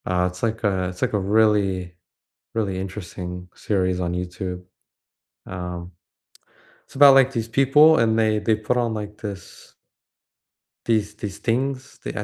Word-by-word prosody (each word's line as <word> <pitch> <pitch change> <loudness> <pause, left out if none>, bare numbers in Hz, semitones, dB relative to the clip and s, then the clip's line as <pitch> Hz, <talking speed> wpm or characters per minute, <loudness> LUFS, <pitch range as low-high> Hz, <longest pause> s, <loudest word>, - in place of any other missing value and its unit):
Uh, 90 0 +1
it's 90 0 -12
like 115 0 -2
a 95 -3 0
it's 90 0 -10
like - - 0
a 105 - +2
really, 100 -3 +1 0.6
really 100 -4 -1
interesting 90 -2 -7
series 95 -3 -1
on 90 -1 -2
YouTube, 90 0 -5 0.8
um, 90 -1 -6 0.9
it's - - -21
about, 140 0 +8
like, 135 0 +5
these 115 -3 -2
people, 145 +6 +5
and 110 -1 +2
they 110 -1 +2
they 110 +1 +1
put 110 +3 -2
on, 120 -2 0
like, 105 -1 -6
this 100 -4 -9 1.1
these 105 -2 0
these 105 -2 -6
things 130 +3 -2
the - - -5
I - - -2
105 Hz, 150 wpm, -23 LUFS, 90-115 Hz, 1.1 s, about